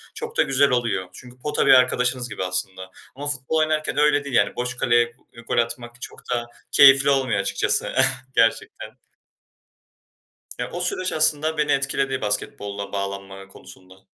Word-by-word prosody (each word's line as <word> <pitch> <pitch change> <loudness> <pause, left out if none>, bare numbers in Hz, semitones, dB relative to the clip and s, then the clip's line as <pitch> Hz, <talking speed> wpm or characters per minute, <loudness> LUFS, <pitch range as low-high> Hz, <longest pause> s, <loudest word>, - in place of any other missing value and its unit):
Çok 460 +1 -7
da - - +5
güzel 135 +1 +3
oluyor 115 -7 -1
çünkü 125 +3 -13
pota 150 +3 -1
bir - - +6
arkadaşınız 125 -1 +2
gibi 105 -3 -5
aslında 95 +1 -4 0.2
ama 145 +2 -6
futbol 140 +2 -2
oynarken 155 0 0
öyle 145 -1 +3
değil, 135 -3 -4
yani, - - +2
boş 125 0 -4
kaleye 120 -1 +2 0.3
gol - - -1
atmak 120 +1 -2
çok - - -9
da 120 -1 -2 0.2
keyifli 135 0 +7
olmuyor 130 -7 +1
açıkçası - - -1 0.4
gerçekten. 115 - 0 1.6
Ya - - -4
o 175 - -5
süreç 185 +1 -2
aslında 155 0 +1
beni 150 -1 +1
etkiledi 135 -1 0
basketbola 100 -1 -4
bağlanma 100 0 -5
konusunda. 95 -1 -16
125 Hz, 150 wpm, -22 LUFS, 105-145 Hz, 1.6 s, keyifli